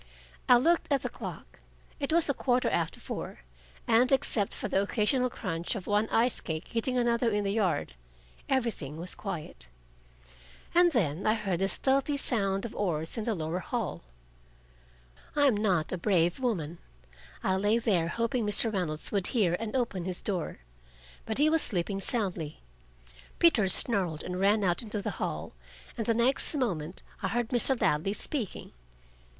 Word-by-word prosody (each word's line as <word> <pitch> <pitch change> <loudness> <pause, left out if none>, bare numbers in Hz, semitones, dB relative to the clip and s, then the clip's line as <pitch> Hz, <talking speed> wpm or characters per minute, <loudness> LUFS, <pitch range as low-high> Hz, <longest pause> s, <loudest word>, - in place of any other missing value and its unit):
I 250 - +9
looked 325 +5 +1
at 275 - +2
the - - -2
clock. - - -9 0.4
It 280 +1 -2
was 335 0 +9
a 280 - +2
quarter 250 -1 +1
after 165 -1 -1
four, - - -6 0.5
and 245 +3 +4
except 230 -6 +2
for - - -4
the 195 - +1
occasional 245 +5 +1
crunch 170 -3 -3
of 195 -5 -6
one 210 +1 +1
ice 235 +2 +2
cake 160 -1 -5
hitting 250 +2 -1
another 235 -1 +2
in 210 -1 0
the 200 0 -1
yard, 180 - 0 0.6
everything 230 - -1
was 175 +2 +1
quiet. 160 - -7 1.0
And 350 0 +5
then 185 - 0
I 215 - +4
heard 195 -6 -2
the 195 - +1
stealthy 275 +6 +1
sound 195 -6 0
of 230 - -6
oars 165 -5 -1
in 225 - -4
the 225 - 0
lower 165 +1 -3
hall. 230 +1 -3 1.3
I 290 -1 +4
am 260 -6 +4
not 190 -6 0
a 185 - -3
brave 175 -1 +1
woman. 175 - -2 0.6
I 190 - +1
lay 205 +4 +2
there, 195 -8 +1
hoping 230 +6 -1
Mr. 210 +2 +2
Reynolds 160 -5 -1
would 200 -3 0
hear 200 -9 +1
and 225 +1 -4
open 215 -9 -1
his 185 -1 -2
door. 180 - -3 0.7
But 220 - -2
he 295 +2 +4
was 320 0 +3
sleeping 195 0 -2
soundly. 185 -9 -3 0.8
Peter 235 - +4
snarled 185 -7 +2
and 180 0 -4
ran 205 +2 +3
out 175 -2 +1
into 215 -2 -4
the 200 - -3
hall, - - -3 0.4
and 225 -3 -4
the 230 - +2
next 255 +6 +1
moment 180 - -2 0.2
I - - 0
heard 240 -1 -1
Mr. 250 +1 +3
Ladley 155 +7 +1
speaking. 230 - -3
210 Hz, 165 wpm, -29 LUFS, 180-240 Hz, 1.3 s, I